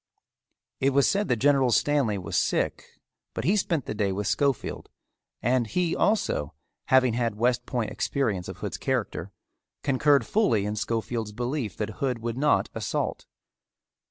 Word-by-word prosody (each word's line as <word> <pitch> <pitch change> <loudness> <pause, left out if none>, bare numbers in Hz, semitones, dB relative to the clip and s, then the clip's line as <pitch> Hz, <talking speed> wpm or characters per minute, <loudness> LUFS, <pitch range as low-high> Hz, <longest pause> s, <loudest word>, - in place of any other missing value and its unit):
It 135 +1 +2
was 140 0 +4
said 200 +1 +1
that 120 - +2
General 135 +1 +3
Stanley 130 -4 +2
was 90 -3 -5
sick - - 0 0.5
but - - -3
he 190 - +3
spent 170 - 0
the - - -3
day 105 -2 0
with 100 +2 -3
Schofield 130 +5 -1 0.5
and 120 0 +2
he 175 +7 0
also, 195 - 0 0.3
having 130 -2 +4
had 115 -2 0
West 125 +1 +1
Point 115 -5 -2
experience 105 -11 -1
of - - -7
Hood's - - -4
character, 95 - -2 0.5
concurred 140 +1 +3
fully 115 - +2
in 105 +1 -2
Schofield's 115 0 -2
belief 120 0 -3
that 105 0 -4
Hood 130 -3 0
would 115 0 -4
not 145 +3 +2
assault. - - -3
125 Hz, 155 wpm, -26 LUFS, 110-140 Hz, 0.5 s, was